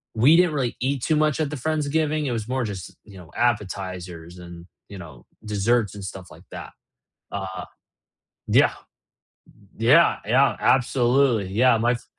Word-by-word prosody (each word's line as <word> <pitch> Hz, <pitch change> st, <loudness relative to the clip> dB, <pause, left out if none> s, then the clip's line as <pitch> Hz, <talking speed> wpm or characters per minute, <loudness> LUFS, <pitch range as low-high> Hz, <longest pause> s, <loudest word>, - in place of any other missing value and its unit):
we 130 Hz, +8 st, +5 dB
didn't 175 Hz, -2 st, +3 dB
really 130 Hz, -5 st, -2 dB
eat 135 Hz, 0 st, -1 dB
too 160 Hz, -, +1 dB
much 150 Hz, -1 st, +1 dB
at 155 Hz, -3 st, -1 dB
the 150 Hz, -, -5 dB
Friends-giving, 155 Hz, +1 st, -1 dB
it 135 Hz, -, -2 dB
was 110 Hz, -2 st, -4 dB
more 130 Hz, 0 st, -1 dB
just, 95 Hz, -5 st, -7 dB
you 100 Hz, -3 st, -14 dB
know, 85 Hz, -2 st, -14 dB
appetizers 95 Hz, -6 st, -3 dB
and, 85 Hz, -1 st, -11 dB, 0.2 s
you 100 Hz, -, -9 dB
know, 80 Hz, -8 st, -12 dB, 0.2 s
desserts 105 Hz, 0 st, 0 dB
and 100 Hz, -, -8 dB
stuff 95 Hz, -1 st, -8 dB
like -, -, -15 dB
that. -, -, -9 dB, 0.6 s
Uh, 95 Hz, -2 st, -5 dB, 0.8 s
yeah -, -, +4 dB, 1.1 s
Yeah 135 Hz, +10 st, +4 dB
yeah, 130 Hz, +6 st, +3 dB
absolutely, 125 Hz, -3 st, +2 dB
yeah, 115 Hz, +3 st, +3 dB
my 120 Hz, +2 st, +2 dB
f 120 Hz, -, -7 dB
120 Hz, 160 wpm, -23 LUFS, 95-140 Hz, 1.1 s, we